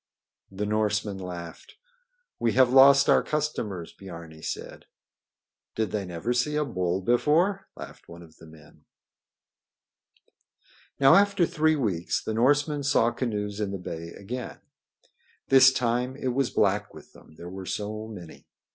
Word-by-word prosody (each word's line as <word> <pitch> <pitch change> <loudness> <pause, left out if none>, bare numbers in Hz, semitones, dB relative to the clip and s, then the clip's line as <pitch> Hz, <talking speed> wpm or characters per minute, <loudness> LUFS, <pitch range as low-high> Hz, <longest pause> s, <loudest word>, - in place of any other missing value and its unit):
The 95 +2 -4
Norsemen 105 -1 -1
laughed. 85 -2 -9 0.6
"We 115 -2 +1
have 130 -1 +4
lost 135 +1 +7
our - - +5
customers," 110 - -3
Biarni 85 -4 -11
said. - - -6 0.9
"Did 110 -4 -1
they 105 -2 -2
never 90 +8 -3
see 125 +5 0
a 150 0 +1
bull 90 -6 -2
before?" 165 - +1
laughed - - -11
one 85 +1 -11
of 80 -1 -18
the 80 - -15
men. 75 -1 -18 2.1
Now 135 -1 +6
after 200 -3 +4
three 155 0 +1
weeks 100 - -1
the 110 - -3
Norsemen 145 +5 +2
saw 135 -4 +2
canoes 105 -4 -3
in 105 -2 -2
the 100 - -4
bay 85 -2 -7
again. 120 +5 -7 0.9
This 130 0 +7
time 125 0 -1
it 130 - -2
was 130 0 0
black 105 0 0
with - - -14
them, 80 - -18
there 85 +2 -10
were 95 -1 -8
so 110 +1 -4
many. 90 -7 -11
110 Hz, 145 wpm, -26 LUFS, 90-135 Hz, 2.1 s, lost